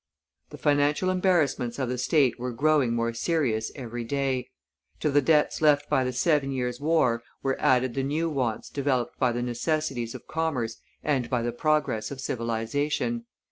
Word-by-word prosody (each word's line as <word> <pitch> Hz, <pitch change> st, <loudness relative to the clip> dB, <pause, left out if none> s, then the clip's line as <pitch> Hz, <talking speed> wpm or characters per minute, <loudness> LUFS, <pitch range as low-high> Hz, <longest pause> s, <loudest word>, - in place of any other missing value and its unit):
The -, -, -10 dB
financial 145 Hz, +5 st, +2 dB
embarrassments 160 Hz, -10 st, +1 dB
of 130 Hz, -2 st, -1 dB
the 125 Hz, 0 st, -3 dB
state 135 Hz, -2 st, +2 dB
were 125 Hz, +1 st, -3 dB
growing 140 Hz, -2 st, +2 dB
more 115 Hz, 0 st, 0 dB
serious 120 Hz, -5 st, 0 dB
every 120 Hz, -3 st, -5 dB
day; 130 Hz, 0 st, -1 dB, 0.5 s
to 150 Hz, -, 0 dB
the 145 Hz, +1 st, +4 dB
debts 150 Hz, +2 st, +2 dB
left 145 Hz, -1 st, +4 dB
by 130 Hz, -, +3 dB
the 125 Hz, -, -1 dB
Seven 140 Hz, +2 st, +2 dB
Years' 125 Hz, -2 st, -2 dB
War 145 Hz, -6 st, +2 dB, 0.2 s
were 135 Hz, 0 st, +1 dB
added 130 Hz, -1 st, +3 dB
the 135 Hz, -, -1 dB
new 150 Hz, +5 st, 0 dB
wants 130 Hz, -8 st, -2 dB
developed 130 Hz, -4 st, -1 dB
by 125 Hz, -, +3 dB
the 120 Hz, +1 st, -2 dB
necessities 125 Hz, -1 st, -2 dB
of -, -, -9 dB
commerce 135 Hz, -9 st, -2 dB, 0.3 s
and 135 Hz, -5 st, 0 dB
by 125 Hz, -3 st, 0 dB
the 120 Hz, -, -1 dB
progress 140 Hz, -4 st, 0 dB
of 140 Hz, -, -7 dB
civilization. 135 Hz, -, -2 dB
135 Hz, 170 wpm, -27 LUFS, 120-150 Hz, 0.5 s, the